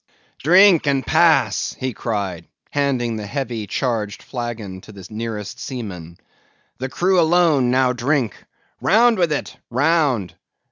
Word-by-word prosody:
"Drink 180 0 +5
and 135 -2 +1
pass!" 160 -8 +2
he 130 -1 -3
cried, 100 -8 -4 0.2
handing 130 -5 0
the 105 -1 -6
heavy 120 -4 -4
charged 110 -5 -2
flagon 115 -7 -6
to 110 - -13
the 100 -3 -12
nearest 110 -2 -5
seaman. 90 -10 -7 0.6
"The 130 +1 -3
crew 185 +5 +2
alone 160 -6 +3
now 130 0 +2
drink. 125 - 0 0.5
Round 225 +1 +4
with 170 -3 +2
it, 150 - -3
round! 130 - +1
125 Hz, 130 wpm, -20 LUFS, 110-155 Hz, 0.6 s, Drink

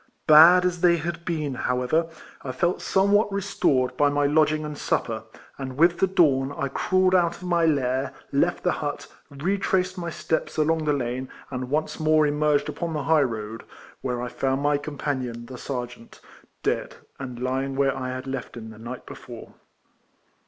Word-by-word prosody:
Bad 170 +4 +8
as 180 -1 -1
they 170 -1 +5
had 170 +1 -5
been, 155 -4 -2
however, 125 +6 0 0.3
I 130 - -5
felt 175 +7 0
somewhat 200 +2 +2
restored 180 -10 0
by 145 0 +4
my 145 0 +1
lodging 155 +1 +2
and 150 0 -5
sup - - 0
per, - - -5 0.3
and 130 -1 -6
with 170 +2 +4
the 190 - +4
dawn 140 -8 +3
I 140 - -1
crawled 185 +6 +2
out 170 -2 +3
of - - -13
my 170 -2 +2
lair, 135 -3 0 0.2
left - - +1
the - - +2
hut, - - -4 0.2
retraced 185 +4 -1
my 170 -1 -3
steps 160 0 -2
along 155 +1 +1
the 150 - +2
lane, 130 -1 -3 0.2
and 125 -1 -4
once 155 +2 -1
more 155 0 +4
emerged 150 0 +1
upon 170 -2 -4
the 150 -2 -2
high 160 0 +4
road, 115 -3 -3 0.4
where 125 -2 -2
I - - -3
found 135 +2 -1
my 145 0 +2
com 145 0 -7
panion, 125 -5 -3
the 125 0 -9
sergeant, 120 -3 -6 0.4
dead, - - -1 0.2
and 130 -3 -6
lying 135 +2 -2
where 135 -1 +2
I 130 -1 -4
had 130 +1 -5
left 135 -3 -5
him 110 -1 -8
the 110 - -13
night 120 +3 -8
before. - - -11
145 Hz, 180 wpm, -25 LUFS, 130-170 Hz, 0.4 s, Bad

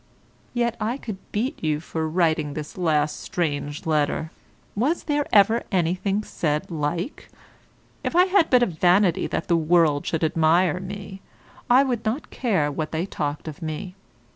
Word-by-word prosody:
Yet 235 -1 +1
I 230 +5 -1
could 215 -8 -7
beat 250 - -2
you 155 -1 +1
for 160 0 -3
writing 155 -3 +1
this 150 -1 -6
last 155 -4 +1
strange 145 -3 -3
letter; 155 0 0 0.4
was 275 +11 0
there 290 -1 0
ever 220 +3 +5
anything 185 +3 0
said 150 -4 -2
like? 165 - -3 0.7
If - - -2
I 360 +1 +6
had 375 -3 +3
but 250 -2 +5
a - - +5
vanity 180 0 +2
that - - -3
the 170 - +3
world 160 -3 +3
should 165 -1 -1
admire 165 +3 +3
me, 195 0 -8 0.5
I 255 +3 +6
would 245 -4 -2
not 225 +7 -3
care 190 - 0
what 155 +2 -4
they 160 +2 -1
talked 150 -5 -4
of 155 +2 -7
me. 160 +4 -5
175 Hz, 160 wpm, -24 LUFS, 155-215 Hz, 0.7 s, I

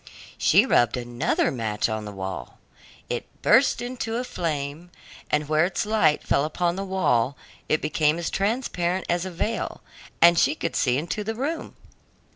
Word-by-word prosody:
She - - +5
rubbed 120 +1 +3
another 120 0 0
match 110 -4 -1
on 110 -1 -3
the 105 - -6
wall. 95 -10 -6 0.5
It - - -3 0.2
burst 260 -1 +4
into 245 -2 -4
a 245 - -1
flame, 160 - -4 0.4
and 150 0 0
where 155 +1 +3
its 195 +5 -2
light 210 -8 +2
fell 140 - +2
upon 170 +3 -1
the 195 - -3
wall 140 -10 +1 0.3
it 155 - +1
became 150 0 +2
as 170 - -3
transparent 195 -4 -1
as 175 +1 0
a - - -6
veil, 215 +6 -3 0.4
and 170 0 +7
she - - +3
could 165 - -3
see 125 0 +2
into 170 +8 -3
the 225 +2 -3
room. 290 +8 -4
170 Hz, 165 wpm, -25 LUFS, 140-195 Hz, 0.5 s, and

